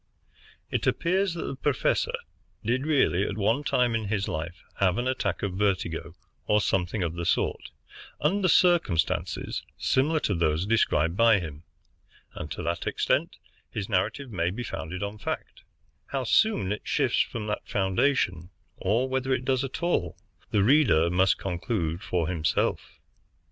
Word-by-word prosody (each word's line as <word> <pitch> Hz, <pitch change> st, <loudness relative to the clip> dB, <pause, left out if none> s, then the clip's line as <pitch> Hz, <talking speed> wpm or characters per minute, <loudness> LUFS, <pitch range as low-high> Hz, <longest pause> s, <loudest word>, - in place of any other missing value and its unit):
It -, -, -1 dB
appears 185 Hz, +1 st, +1 dB
that 170 Hz, -, -4 dB
the -, -, -4 dB
professor 135 Hz, -1 st, 0 dB, 0.5 s
did 130 Hz, +6 st, 0 dB
really, 135 Hz, -, +3 dB
at 100 Hz, -, -4 dB
one 110 Hz, +7 st, +1 dB
time 125 Hz, -4 st, +2 dB
in 110 Hz, -1 st, -1 dB
his 100 Hz, -1 st, -1 dB
life, 85 Hz, +3 st, -5 dB, 0.2 s
have 95 Hz, -2 st, +3 dB
an 120 Hz, +1 st, -1 dB
attack 130 Hz, -4 st, -1 dB
of 100 Hz, -2 st, -1 dB
vertigo, 90 Hz, -4 st, -1 dB, 0.3 s
or 105 Hz, -, +4 dB
something 95 Hz, 0 st, 0 dB
of 85 Hz, -2 st, -2 dB
the 85 Hz, 0 st, -4 dB
sort, -, -, 0 dB, 0.5 s
under 185 Hz, +6 st, +2 dB
circumstances 170 Hz, -, +2 dB, 0.2 s
similar 155 Hz, +5 st, +2 dB
to 100 Hz, -, 0 dB
those 85 Hz, 0 st, +1 dB
described 85 Hz, -7 st, +2 dB
by 115 Hz, -1 st, +5 dB
him, 80 Hz, -1 st, -8 dB, 0.7 s
and 75 Hz, -, -6 dB
to -, -, -5 dB
that 85 Hz, +1 st, -2 dB
extent -, -, 0 dB, 0.3 s
his 100 Hz, -2 st, -4 dB
narrative 110 Hz, +6 st, -1 dB
may 85 Hz, -4 st, 0 dB
be 115 Hz, +7 st, -4 dB
founded 90 Hz, 0 st, -5 dB
on 100 Hz, +1 st, -5 dB
fact -, -, -5 dB, 0.5 s
How 135 Hz, -1 st, -2 dB
soon 125 Hz, -, +2 dB
it 105 Hz, -, -2 dB
shifts -, -, +1 dB
from 115 Hz, -3 st, -3 dB
that 105 Hz, 0 st, -4 dB
foundation, 95 Hz, -, +1 dB, 0.3 s
or 115 Hz, +7 st, +1 dB
whether 130 Hz, 0 st, -1 dB
it 130 Hz, -1 st, 0 dB
does 130 Hz, 0 st, +1 dB
at 135 Hz, +5 st, -5 dB
all, 90 Hz, -, 0 dB, 0.3 s
the 105 Hz, -3 st, +2 dB
reader 105 Hz, -, +4 dB
must 95 Hz, +1 st, +3 dB
conclude 90 Hz, -2 st, -2 dB
for 85 Hz, -5 st, -1 dB
himself. 85 Hz, -4 st, -1 dB
105 Hz, 155 wpm, -27 LUFS, 90-130 Hz, 0.7 s, by